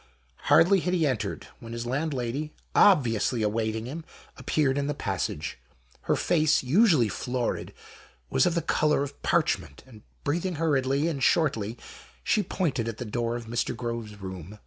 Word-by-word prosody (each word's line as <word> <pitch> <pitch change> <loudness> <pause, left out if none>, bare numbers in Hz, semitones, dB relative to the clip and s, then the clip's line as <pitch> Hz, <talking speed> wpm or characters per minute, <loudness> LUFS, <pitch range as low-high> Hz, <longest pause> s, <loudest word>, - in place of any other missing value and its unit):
Hardly 190 +3 +5
had 180 +1 0
he 165 -3 +2
entered, 130 -7 -2
when 115 0 -9
his 115 0 -4
landlady, 140 +1 -2 0.2
obviously 120 - +4
awaiting 110 +1 -1
him, 155 +6 -6 0.3
appeared 145 -3 0
in 140 - -1
the 145 - -2
passage: 95 - -3 0.5
her - - +2
face, 155 -4 +2
usually 155 - +4
florid, 125 +3 -3 0.6
was - - +3
of 175 - 0
the 170 - 0
colour 150 -2 +2
of 140 0 -8
parchment, 70 - 0
and, 115 -5 -15 0.2
breathing 175 +4 -1
hurriedly 145 -2 +1
and 145 -5 -2
shortly, 120 -8 +1 0.5
she 210 - +2
pointed 165 - -1
at 115 -2 -4
the 125 - -5
door 115 +2 -2
of 120 -1 -6
Mr. 115 +1 -2
Groves' 115 -4 -5
room. 95 +1 -8
130 Hz, 155 wpm, -27 LUFS, 115-155 Hz, 0.6 s, Hardly